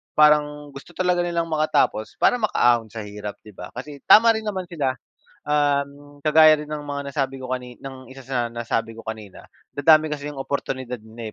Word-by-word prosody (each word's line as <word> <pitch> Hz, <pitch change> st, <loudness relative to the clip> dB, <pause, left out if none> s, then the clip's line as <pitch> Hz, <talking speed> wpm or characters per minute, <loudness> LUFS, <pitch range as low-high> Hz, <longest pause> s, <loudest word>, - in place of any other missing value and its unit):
parang 150 Hz, -1 st, +3 dB
gusto 140 Hz, +5 st, -12 dB
talaga 180 Hz, -1 st, +1 dB
nilang 170 Hz, -1 st, -2 dB
makatapos 155 Hz, -8 st, 0 dB
para 245 Hz, -, +3 dB
makaahon 120 Hz, -, +2 dB
sa 110 Hz, +1 st, -7 dB
hirap, 105 Hz, 0 st, -7 dB
'di 105 Hz, -, -13 dB
ba? 90 Hz, -1 st, -9 dB
Kasi 140 Hz, +3 st, -8 dB
tama 230 Hz, +1 st, +8 dB
rin 220 Hz, -1 st, -4 dB
naman 190 Hz, -3 st, -3 dB
sila. 140 Hz, -6 st, -1 dB, 0.5 s
Um, 145 Hz, 0 st, -1 dB
kagaya 155 Hz, 0 st, +6 dB
rin 150 Hz, -, -9 dB
ng 150 Hz, -1 st, -5 dB
mga 145 Hz, -1 st, -4 dB
nasabi 135 Hz, -1 st, -2 dB
ko 130 Hz, -, -7 dB
kani 125 Hz, -1 st, -5 dB
ng 130 Hz, -1 st, -10 dB
isa 135 Hz, -, -12 dB
sa 120 Hz, -3 st, -3 dB
nasabi 115 Hz, -1 st, -2 dB
ko 115 Hz, -, -11 dB
kanina, 110 Hz, -3 st, -9 dB, 0.2 s
dadami 155 Hz, +1 st, +4 dB
kasi 145 Hz, 0 st, -4 dB
yung 145 Hz, -, -8 dB
oportunidad 130 Hz, -3 st, -4 dB
na 110 Hz, 0 st, -9 dB
140 Hz, 185 wpm, -23 LUFS, 120-150 Hz, 0.5 s, tama